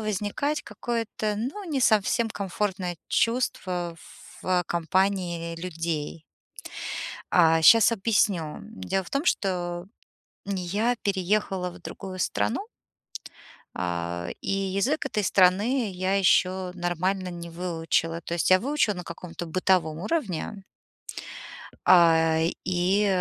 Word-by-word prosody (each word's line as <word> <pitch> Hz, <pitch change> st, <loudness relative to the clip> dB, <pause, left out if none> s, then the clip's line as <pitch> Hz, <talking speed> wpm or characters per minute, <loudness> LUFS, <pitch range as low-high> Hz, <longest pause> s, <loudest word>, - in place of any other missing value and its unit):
возникать 215 Hz, +8 st, -1 dB
какое-то, 215 Hz, -1 st, -3 dB
ну, 275 Hz, -, -4 dB
не 295 Hz, -6 st, -2 dB
совсем 220 Hz, +1 st, +3 dB
комфортное 190 Hz, -3 st, -2 dB
чувство 185 Hz, -8 st, 0 dB, 0.5 s
в 180 Hz, -1 st, +2 dB
компании 170 Hz, -1 st, 0 dB
людей. 165 Hz, -2 st, -4 dB, 1.1 s
А, 165 Hz, -2 st, +5 dB
щас 225 Hz, +8 st, +7 dB
объясню. 190 Hz, -7 st, +1 dB
Дело 95 Hz, -, -3 dB
в -, -, -11 dB
том, 275 Hz, +3 st, -1 dB
что 175 Hz, -, -1 dB, 0.6 s
я 200 Hz, +5 st, 0 dB
переехала 190 Hz, -2 st, 0 dB
в -, -, -13 dB
другую 185 Hz, -2 st, -7 dB
страну 325 Hz, -, -1 dB, 1.1 s
а, 85 Hz, -1 st, -3 dB
и -, -, -2 dB
язык 195 Hz, +10 st, 0 dB
этой 210 Hz, -6 st, -1 dB
страны 200 Hz, +6 st, +3 dB
я 185 Hz, +1 st, 0 dB
ещё 185 Hz, -1 st, +3 dB
нормально 180 Hz, +2 st, -1 dB
не 170 Hz, -1 st, -7 dB
выучила. 165 Hz, -1 st, -1 dB
То 170 Hz, -, -5 dB
есть 170 Hz, -, +1 dB
я 185 Hz, -, +7 dB
выучила 265 Hz, -6 st, +1 dB
на 180 Hz, -, -6 dB
каком-то 170 Hz, 0 st, -7 dB
бытовом 165 Hz, -2 st, +1 dB
уровне 205 Hz, -, -2 dB, 1.2 s
а, 165 Hz, -2 st, +6 dB, 0.2 s
и 185 Hz, +3 st, +2 dB
185 Hz, 110 wpm, -26 LUFS, 170-210 Hz, 1.2 s, щас